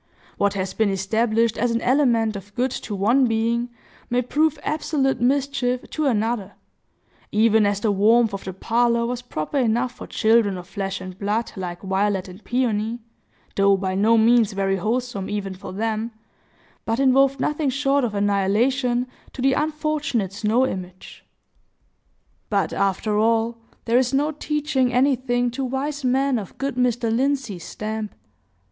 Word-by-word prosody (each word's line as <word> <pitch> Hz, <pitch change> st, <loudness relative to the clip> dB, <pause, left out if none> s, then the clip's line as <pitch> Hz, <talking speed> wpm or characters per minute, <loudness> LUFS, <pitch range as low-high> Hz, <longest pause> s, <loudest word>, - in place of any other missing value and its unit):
What 200 Hz, 0 st, +2 dB
has 190 Hz, -1 st, -2 dB
been 220 Hz, -2 st, +1 dB
established 220 Hz, +4 st, +1 dB
as 245 Hz, +3 st, +2 dB
an 230 Hz, 0 st, 0 dB
element 235 Hz, -5 st, +2 dB
of 200 Hz, +1 st, -9 dB
good 255 Hz, +1 st, 0 dB
to 210 Hz, -, -5 dB
one 235 Hz, +7 st, +3 dB
being 230 Hz, +2 st, 0 dB, 0.4 s
may 245 Hz, +1 st, +1 dB
prove 305 Hz, +5 st, +1 dB
absolute 290 Hz, -4 st, 0 dB
mischief 260 Hz, -1 st, 0 dB
to 310 Hz, -2 st, 0 dB
another; 220 Hz, -4 st, -1 dB, 0.8 s
even 215 Hz, 0 st, +4 dB
as 200 Hz, 0 st, -1 dB
the 215 Hz, -, +2 dB
warmth 220 Hz, +3 st, +4 dB
of 195 Hz, -, -5 dB
the 190 Hz, -, -5 dB
parlor 235 Hz, +4 st, +1 dB
was 245 Hz, +1 st, -3 dB
proper 245 Hz, -, -3 dB
enough 240 Hz, 0 st, +1 dB
for -, -, -10 dB
children 220 Hz, -3 st, +2 dB
of 175 Hz, -1 st, -9 dB
flesh 195 Hz, -1 st, -4 dB
and 185 Hz, 0 st, -9 dB
blood, 210 Hz, +3 st, -1 dB
like 180 Hz, -2 st, -6 dB
Violet 195 Hz, 0 st, 0 dB
and 185 Hz, +3 st, -12 dB
Peony,—though 225 Hz, -4 st, -1 dB
by 190 Hz, -1 st, -2 dB
no 215 Hz, +4 st, +3 dB
means 225 Hz, -1 st, +4 dB
very 195 Hz, 0 st, 0 dB
wholesome, 220 Hz, 0 st, -2 dB
even 200 Hz, -2 st, -3 dB
for 185 Hz, 0 st, -9 dB
them,—but 225 Hz, +2 st, -5 dB
involved 275 Hz, 0 st, +4 dB
nothing 300 Hz, 0 st, 0 dB
short 275 Hz, +1 st, +1 dB
of 220 Hz, -4 st, -2 dB
annihilation 230 Hz, +6 st, +1 dB, 0.3 s
to 260 Hz, -, -6 dB
the 270 Hz, 0 st, +4 dB
unfortunate 300 Hz, -, -1 dB
snow 225 Hz, +5 st, +2 dB
image. 185 Hz, -5 st, -7 dB, 1.3 s
But, 200 Hz, -6 st, 0 dB
after 205 Hz, +2 st, 0 dB
all, 230 Hz, +1 st, +1 dB, 0.3 s
there 235 Hz, +2 st, +3 dB
is 260 Hz, +1 st, 0 dB
no 295 Hz, +3 st, +1 dB
teaching 295 Hz, -4 st, -1 dB
anything 245 Hz, -1 st, +1 dB
to 270 Hz, +3 st, -4 dB
wise 275 Hz, +3 st, -3 dB
men 260 Hz, 0 st, +2 dB
of 195 Hz, -, -10 dB
good 275 Hz, 0 st, -2 dB
Mr. 240 Hz, -2 st, +1 dB
Lindsey's 260 Hz, -8 st, -1 dB
stamp. 215 Hz, 0 st, -5 dB
230 Hz, 150 wpm, -23 LUFS, 205-255 Hz, 1.3 s, even